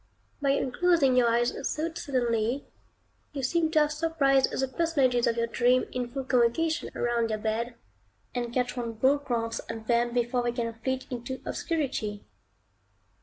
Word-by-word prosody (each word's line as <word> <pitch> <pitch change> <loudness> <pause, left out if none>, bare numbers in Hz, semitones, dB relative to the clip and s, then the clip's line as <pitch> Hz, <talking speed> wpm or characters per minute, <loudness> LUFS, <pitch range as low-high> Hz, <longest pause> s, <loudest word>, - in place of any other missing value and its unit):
By 280 - +1
unclosing 280 0 +2
your 245 -2 +4
eyes 240 +1 +2 0.2
so 320 +2 -2
suddenly, 245 -4 -1 0.7
you 275 -2 -4
seem 320 +5 +1
to 315 -1 +4
have 300 0 +2
surprised 300 -4 +2
the 265 - -1
personages 260 -5 +1
of 235 - +1
your 230 - +2
dream 245 +2 +2
in 250 -1 -2
full 270 +2 -5
convocation 265 +7 +1
round 235 -1 0
your 215 - -1
bed, 225 +3 -2 0.6
and 240 -1 -2
catch 250 0 -1
one 235 -2 -3
broad 275 +5 +2
glance 230 -3 -1
at 225 -1 -6
them 235 +1 +2
before 245 +1 0
they 240 0 -1
can 230 -2 -2
flit 260 +1 -2
into 255 +2 -5
obscurity. 265 - -2
250 Hz, 160 wpm, -28 LUFS, 235-280 Hz, 0.7 s, your